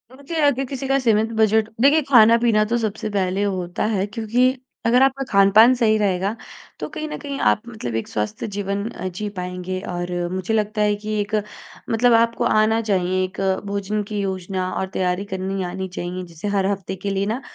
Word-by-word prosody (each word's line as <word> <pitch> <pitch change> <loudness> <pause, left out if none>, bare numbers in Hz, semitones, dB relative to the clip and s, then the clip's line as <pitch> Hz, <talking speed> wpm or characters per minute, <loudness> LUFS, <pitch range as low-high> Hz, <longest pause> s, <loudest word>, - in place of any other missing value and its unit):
मुझे 280 +4 -8
अगर 270 -2 +2
किसी 270 +1 -5
का 270 0 +3
सीमित 225 -2 +2
बजट 220 0 +3
देखिए 295 +3 +5
ख़ाना-पीना 230 -2 +5
तो 235 +2 0
सबसे 220 -1 -3
पहले 195 0 0
होता 185 -3 -2
है 195 0 0
क्योंकि 225 +3 0 0.4
अगर 245 +3 +4
आपका 270 0 +1
ख़ान-पान 200 +5 +6
सही 220 -3 +3
रहेगा 200 +1 0 0.4
तो - - -4
कहीं 310 0 -5
न - - -5
कहीं 280 -2 -5
आप 215 - +1
मतलब 165 - -5
एक 115 - -2
स्वस्थ 105 0 -3
जीवन 200 +1 -2
अ, 185 - -6
जी 190 +4 -5
पाएँगे। 180 +1 -4
और 175 0 -4
अ, 175 0 -2
मुझे 190 +4 -2
लगता 215 0 0
है 210 0 +3
कि 215 0 -3
एक 205 +1 -2 0.5
मतलब 235 +1 +3
आपको 230 0 +1
आना 215 +1 +3
चाहिए 185 -3 0
एक 185 +1 -6 0.3
भोजन 200 +1 -2
की 205 0 -4
योजना 185 -1 -2
और 190 - -2
तैयारी 180 +1 -1
करनी 190 0 -2
आनी 190 0 -4
चाहिए, 180 0 -5
जैसे 170 +3 -7
हर 190 -1 +2
हफ़्ते 190 -1 -4
के 200 +2 -4
लिए 195 0 0
ना 260 - -5
205 Hz, 195 wpm, -21 LUFS, 185-225 Hz, 0.5 s, ख़ान-पान